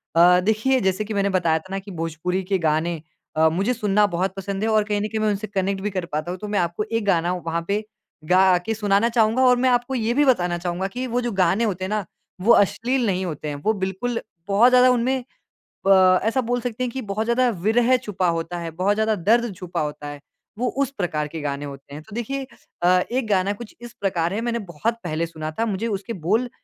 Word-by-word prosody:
अ, 175 +2 +6
देखिए 220 +7 +2
जैसे 190 +3 0
कि 215 - -5
मैंने 200 -1 +1
बताया 165 -3 +1
था 185 +4 -15
ना 195 - -1
कि 205 - -8
भोजपुरी 165 +3 -2
के 195 - +4
गाने 160 +1 0 0.3
अ, 160 +1 +4
मुझे 195 +9 0
सुनना 210 -3 +2
बहुत 185 +1 -1
पसंद 195 +1 -4
है - - +1
और 215 -1 +3
कहीं 210 0 -1
न 210 - -1
कहीं 220 - -1
मैं 215 - +2
उनसे 205 +1 -2
कनेक्ट 195 -1 -1
भी 210 - -1
कर 185 -2 -3
पाता 155 +3 -2
हूँ 180 - -5
तो 210 - -6
मैं 205 0 0
आपको 175 +3 -1
एक 225 -2 0
गाना 175 -2 +2
वहाँ 165 +1 -1
पे 200 +1 +1 0.5
गा 185 +2 +5
के 225 - 0
सुनाना 205 +1 +2
चाहूँगा 225 +2 +3
और 250 -1 +5
मैं 260 - +4
आपको 245 +1 +1
ये 230 -1 0
भी 295 - +5
बताना 180 -10 +2
चाहूँगा 175 +2 -2
कि 255 +1 -3
वो 245 - +2
जो 240 -1 -2
गाने 190 +4 +3
होते 190 -5 -1
हैं 190 - -3
ना 215 0 0 0.4
वो 225 +5 +6
अश्लील 240 +5 +1
नहीं 190 -3 0
होते 155 -3 -5
हैं। 145 - -3
वो 220 - +3
बिल्कुल 210 +6 -2 0.3
बहुत 205 +5 +5
ज़्यादा 250 0 +6
उनमें 250 +2 +1 0.7
अ, 185 -1 +6
ऐसा 225 +5 +1
बोल 245 0 -1
सकते 245 0 -3
हैं 250 - -2
कि 265 - -4
बहुत 215 +2 -1
ज़्यादा 245 +2 +2 0.2
विरह 245 +3 +4
छुपा 205 -6 -2
होता 165 +2 -5
है, 165 -1 -5
बहुत 185 +5 +1
ज़्यादा 220 0 +1
दर्द 225 +4 +2
छुपा 180 -3 -4
होता 150 -1 -4
है। 145 0 -7 0.4
वो 250 - +1 0.2
उस 275 - -4
प्रकार 155 -5 -1
के 160 +1 -7
गाने 145 0 -3
होते 140 0 -10
हैं। 150 - -7
तो 215 +5 -12
देखिए 265 +4 -3 0.4
अ, 180 +1 +5
एक 250 -1 -1
गाना 200 -1 +2
कुछ 215 +2 -11
इस 240 -1 -9
प्रकार 175 -3 0
है 215 - -2
मैंने 235 0 -1 0.2
बहुत 225 +10 0
पहले 165 -1 -1
सुना 155 -2 -6
था। 230 - +2
मुझे 220 +5 -2
उसके 205 +1 -3
बोल 230 +6 +2
200 Hz, 240 wpm, -23 LUFS, 175-230 Hz, 0.7 s, अ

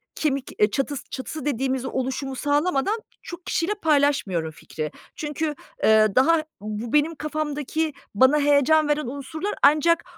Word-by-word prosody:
kemik, 275 -4 -1
eee, 210 0 +4
çatıs 275 +2 -2
çatısı 280 +2 -6
dediğimiz 265 -1 -1
oluşumu 265 +1 -3
sağlamadan 295 - +1 0.2
çok 345 0 -9
kişiyle 355 +5 0
paylaşmıyorum 280 - +2
fikri. 155 0 -6 0.2
Çünkü, 300 0 -3 0.3
eee, 220 0 +6
daha 315 +5 +4 0.2
bu 215 +3 -5
benim 300 +2 +3
kafamdaki 305 0 -2 0.2
bana 260 +7 +5
heyecan 290 +2 +4
veren 295 -3 0
unsurlar 295 +9 -4
ancak 310 +4 +5
285 Hz, 130 wpm, -24 LUFS, 260-310 Hz, 0.3 s, eee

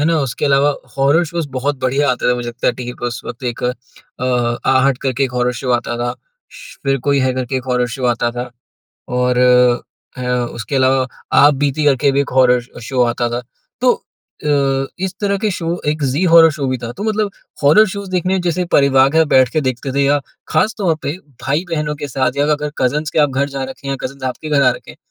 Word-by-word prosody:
है 150 - +2
ना? 165 0 +2
उसके 135 -1 -2
अलावा 140 0 +3 0.2
हॉरर 145 +5 +3
शोज़ 165 -2 -4
बहुत 140 +3 -1
बढ़िया 135 +2 +1
आते 125 - 0
थे, - - +3
मुझे 120 -1 -4
लगता 120 +1 -4
है, - - +4
टीवी 125 0 -6
पे - - -4
उस 120 - -4
वक़्त 120 +3 -8
एक 120 -1 -3
अ, 125 -1 -3
आहट 130 0 +3
करके 135 0 0
एक 125 - -4
हॉरर 125 0 0
शो 130 - -2
आता 120 0 -1
था। 120 0 -1 0.4
श्श्श, - - -12
फिर 135 0 +1
कोई 140 -1 +3
है, 130 0 +1
करके 130 +1 -2
एक 130 - -4
हॉरर 125 0 +1
शो 130 - -4
आता 120 0 -1
था 125 0 -4 0.7
और 125 0 +1 0.8
ह 125 - -4 0.3
उसके 120 +4 -5
अलावा 130 0 +3 0.3
आपबीती 145 +1 +3
करके 140 0 +3
भी 140 - +2
एक 140 - -2
हॉरर 125 -1 +5 0.2
अ, - - -7
शो 125 +2 0
आता 120 0 0
था। 120 +1 -2 0.4
तो 250 -1 +5 0.5
अ, 135 -2 +1 0.2
इस 185 - -3
तरह 200 -1 +1
के 215 +1 0
शो 170 -3 -4 0.2
एक 155 0 -1
ज़ी 135 +7 0
हॉरर 165 -1 +8
शो 150 -3 -3
भी 130 - 0
था, 120 -1 -6
तो 200 - -8
मतलब 215 -2 0 0.3
हॉरर 185 +10 +6
शोज़ 200 -2 -6
देखने 185 +1 0
जैसे 175 +2 0
परिवार 135 -1 +5
के 160 - +2
साथ 160 - +6
बैठ 130 -3 +4
के 155 - +1
देखते 130 0 -3
थे 140 - +1
या 145 +1 +3 0.3
खास 215 +3 +1
तौर 180 -5 +2
पे 140 - -2 0.3
भाई-बहनों 150 +1 -1
के 145 0 -5
साथ 130 0 -1
या 145 - +2
अगर 150 0 -2
कज़िन्स 150 +4 0
के - - -1
आप 145 -2 +4
घर 140 +2 0
जा 135 -1 -4
रखे 135 +1 -8
हैं, 135 - -1
कज़िन्स 135 +1 -6
आपके 130 +4 -4
घर 145 -2 +3
आ - - +5
रखे - - -7
हैं, - - -14
135 Hz, 230 wpm, -17 LUFS, 125-150 Hz, 0.8 s, हॉरर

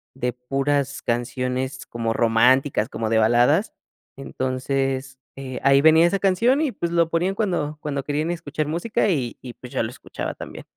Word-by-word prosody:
de 125 -2 -1
puras 135 +2 -1
canciones 125 +2 -2
como 115 -1 -2
románticas, 120 +1 +3
como 115 -4 -3
de 115 - +2
baladas. 120 - +3 0.4
Entonces, 135 0 -2 0.2
eh, 130 -2 -6
ahí 140 0 +5
venía 160 +2 +6
esa 195 +3 0
canción 230 +9 +2
y 300 -5 0
pues 170 -3 -3
lo 170 -1 +2
ponían 175 +4 0
cuando 170 -8 -2
cuando 140 -2 -3
querían 150 +3 -2
escuchar 155 -3 -3
música 175 +7 0
y 130 -10 -1
y 125 -2 -8
pues 125 0 -12
yo - - 0
lo 110 - -3
escuchaba - - -6
también. - - -9
135 Hz, 165 wpm, -23 LUFS, 125-165 Hz, 0.4 s, venía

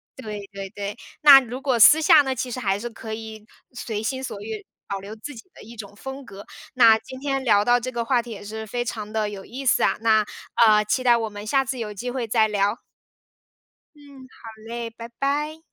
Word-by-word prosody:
对 215 -5 -7
对 195 -1 -7
对， 205 -1 -6 0.2
那 285 -2 +10
如 250 +1 -7
果 265 -3 +1
私 305 +8 +8
下 305 -1 +6
呢， 265 -1 -2
其 255 0 -4
实 255 - -5
还 200 -3 0
是 240 +2 -5
可 220 -1 -8
以 220 -1 -8 0.3
随 220 -3 -5
心 260 +3 -3
所 210 -5 -6
欲， 215 0 -7 0.2
保 200 -1 -4
留 200 +3 -9
自 285 +7 -9
己 225 - -10
的 - - -15
一 230 +2 -12
种 205 -2 -9
风 265 +4 -8
格。 200 -3 -12 0.3
那 230 -3 +7
今 260 +3 -11
天 270 -1 -2
聊 210 -4 +3
到 245 0 +4
这 255 +2 -4
个 235 -1 -3
话 245 -2 +2
题 240 - -13
也 205 - -8
是 220 +1 -7
非 240 +2 -3
常 215 -2 -5
地 215 -1 -1
有 195 -2 -8
意 265 +6 -8
思 - - +3
啊， - - +2
那， 220 -1 +4 0.4
呃， 210 -1 +5
期 255 +5 0
待 240 -1 +5
我 225 -1 -3
们 205 0 -9
下 270 +3 +1
次 260 0 -4
有 215 -2 -4
机 245 +5 -5
会 250 -2 -3
再 220 0 +3
聊。 205 +2 -1 1.2
嗯， 275 -3 -15
好 230 -2 -14 0.2
嘞， 235 -1 -5
拜 230 +1 -10
拜。 295 +3 -1
230 Hz, 245 characters per minute, -23 LUFS, 215-260 Hz, 1.2 s, 那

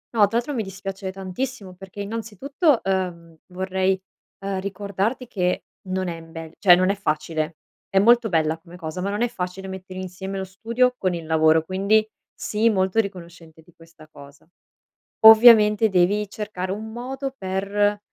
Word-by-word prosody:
No, - - -1
tra 225 +4 -1
l'altro 260 +5 -2
mi 235 - -1
dispiace 195 -1 -6
tantissimo 195 +2 -6
perché, 190 +2 -12
innanzitutto, 230 - -1
uhm, 180 -3 -3
vorrei, 190 +1 -1 0.5
uhm, 195 -1 -2
ricordarti 200 +5 -3
che 180 -5 -1 0.2
non 185 0 -2
è 170 -1 -4
in 165 0 -14
bel 165 -1 -8
cioè, 180 -3 +7
non 185 +2 +2
è - - -2
facile. 155 -3 -2 0.3
È 195 - -1
molto 230 +3 +5
bella 160 -2 0
come 170 +1 -15
cosa, 170 0 -6
ma 195 - -2
non 205 +3 -1
è - - +2
facile 190 -4 -6
mettere 185 0 -8
insieme 190 +1 -6
lo 190 - -3
studio 230 +6 0
con 185 -2 0
il 165 - -7
lavoro, 160 0 +3
quindi 200 +5 +1 0.3
sii 215 +2 0
molto 190 0 +1
riconoscente 170 -5 -6
di 175 +1 -23
questa 165 -1 -18
cosa. 140 -1 -16 0.7
Ovviamente, 220 -1 +8
devi 195 +3 +2
cercare 200 -3 -5
un 215 +3 -5
modo 265 +3 -5
per, 200 0 -1
190 Hz, 165 wpm, -23 LUFS, 180-215 Hz, 0.7 s, Ovviamente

